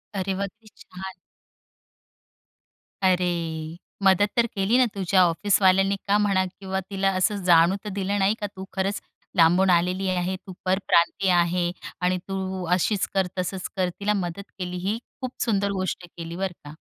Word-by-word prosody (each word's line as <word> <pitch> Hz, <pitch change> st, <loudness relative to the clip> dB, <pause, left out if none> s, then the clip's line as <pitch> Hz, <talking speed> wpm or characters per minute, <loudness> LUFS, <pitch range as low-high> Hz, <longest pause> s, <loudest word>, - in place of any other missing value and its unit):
अरे 190 Hz, 0 st, -1 dB
वाह! 200 Hz, -, -1 dB
किती 215 Hz, +2 st, -20 dB
छान. 190 Hz, +1 st, -9 dB, 1.9 s
अरे! 170 Hz, -3 st, 0 dB, 0.3 s
मदत 195 Hz, +2 st, +4 dB
तर 235 Hz, -, +5 dB
केली 195 Hz, +5 st, +2 dB
ना, 255 Hz, -, +5 dB
तुझ्या 190 Hz, -1 st, +3 dB
ऑफिसवाल्यांनी 195 Hz, +2 st, +3 dB
का 205 Hz, +1 st, +4 dB
म्हणा 200 Hz, -2 st, +2 dB, 0.2 s
किंवा 190 Hz, -1 st, -2 dB
तिला 195 Hz, -1 st, +1 dB
असं 200 Hz, +1 st, +1 dB
जाणू 170 Hz, +1 st, +5 dB
तर 210 Hz, -, -5 dB
दिलं 200 Hz, +1 st, -1 dB
नाही 195 Hz, +2 st, +3 dB
का? 205 Hz, -, -1 dB
तू 190 Hz, -, -7 dB
खरंच 195 Hz, +1 st, -1 dB, 0.3 s
लांबून 180 Hz, +3 st, +5 dB
आलेली 180 Hz, +2 st, +2 dB
आहे, 185 Hz, +1 st, -1 dB
तू 185 Hz, 0 st, -11 dB
परप्रांतीय 185 Hz, 0 st, +2 dB
आहे. 175 Hz, 0 st, +2 dB, 0.3 s
आणि 180 Hz, 0 st, +2 dB
तू 190 Hz, -1 st, -3 dB
अशीच 190 Hz, +2 st, +1 dB
कर, 190 Hz, -2 st, +2 dB
तसंच 185 Hz, 0 st, -3 dB
कर, 185 Hz, -2 st, +1 dB
तिला 210 Hz, +1 st, +1 dB
मदत 195 Hz, 0 st, -4 dB
केली. 180 Hz, 0 st, -4 dB
ही 195 Hz, +5 st, -1 dB, 0.2 s
खूप 255 Hz, -1 st, -3 dB
सुंदर 200 Hz, -3 st, +1 dB
गोष्ट 185 Hz, -2 st, -3 dB
केली 170 Hz, -1 st, -8 dB
बरं 190 Hz, 0 st, -2 dB
का. 145 Hz, -, -9 dB
190 Hz, 160 wpm, -25 LUFS, 180-200 Hz, 1.9 s, तर